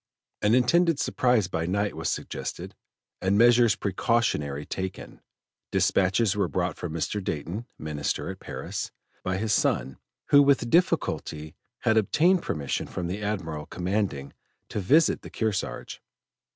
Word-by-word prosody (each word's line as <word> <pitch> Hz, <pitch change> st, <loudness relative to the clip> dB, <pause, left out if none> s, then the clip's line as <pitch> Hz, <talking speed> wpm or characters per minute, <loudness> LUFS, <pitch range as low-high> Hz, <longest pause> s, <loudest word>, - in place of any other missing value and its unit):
An 105 Hz, +3 st, +4 dB
intended 165 Hz, +5 st, +3 dB
surprise 125 Hz, -6 st, +2 dB
by 85 Hz, -2 st, -2 dB
night 100 Hz, +3 st, 0 dB
was -, -, -2 dB
suggested, -, -, -5 dB, 0.5 s
and 95 Hz, +2 st, +2 dB
measures 120 Hz, -1 st, +6 dB
precautionary 95 Hz, -, 0 dB
taken. 95 Hz, +3 st, -6 dB, 0.5 s
Dispatches 100 Hz, +2 st, +2 dB
were 100 Hz, -, +1 dB
brought 90 Hz, -2 st, -1 dB
from 90 Hz, -, -5 dB
Mr. 95 Hz, +5 st, -2 dB
Dayton, 90 Hz, -, -4 dB
Minister 75 Hz, -2 st, -3 dB
at -, -, -10 dB
Paris, -, -, -5 dB, 0.3 s
by 95 Hz, 0 st, -1 dB
his 110 Hz, +1 st, 0 dB
son, 65 Hz, -, 0 dB, 0.3 s
who 145 Hz, -, +8 dB
with 140 Hz, -4 st, +3 dB
difficulty 80 Hz, -, +1 dB, 0.3 s
had 110 Hz, -, +3 dB
obtained 165 Hz, -, +3 dB
permission 70 Hz, -3 st, -3 dB
from 90 Hz, -, -4 dB
the 95 Hz, +4 st, -3 dB
Admiral 85 Hz, -8 st, -3 dB
commanding 90 Hz, -6 st, -2 dB, 0.4 s
to -, -, -3 dB
visit 150 Hz, -, +3 dB
the -, -, -10 dB
Kearsarge. 100 Hz, -, -3 dB
100 Hz, 135 wpm, -26 LUFS, 85-120 Hz, 0.5 s, who